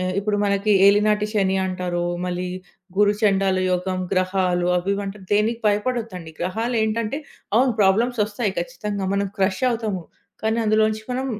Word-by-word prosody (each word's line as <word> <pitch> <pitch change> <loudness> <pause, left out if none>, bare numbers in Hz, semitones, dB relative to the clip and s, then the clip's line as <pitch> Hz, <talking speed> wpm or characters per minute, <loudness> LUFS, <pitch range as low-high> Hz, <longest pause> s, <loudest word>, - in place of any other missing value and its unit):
ఆహ్, 185 0 -1
ఇప్పుడు 205 +1 0
మనకి 200 +1 +2
ఏలినాటి 210 +1 +4
శని 195 -3 +1
అంటారు. 180 -1 -2 0.2
మళ్ళీ, 180 0 -3 0.5
గురుచండాలు 200 -2 +2
యోగం, 185 +1 -1
గ్రహాలు, 185 -1 +1
అవి, 180 +2 -1
ఇవి, 200 - -3
అంటారు 195 0 -7
దేనికి 220 +3 +2
భయపడొద్దండి. 210 -5 -1
గ్రహాలేంటంటే, 220 +5 -1 0.4
అవును. 255 +1 +4
ప్రాబ్లమ్స్ 220 +5 +3
ఒస్తాయి 210 -1 -2
ఖచ్చితంగా. 200 +1 -3
మనం 200 0 0
క్రష్ 190 +2 0
అవుతాము. 220 -6 -2 0.4
కానీ, 220 +1 +1
అందులో 215 0 +3
నుంచి 215 0 -6
మనం 260 +2 -2
205 Hz, 140 wpm, -22 LUFS, 185-220 Hz, 0.5 s, ఏలినాటి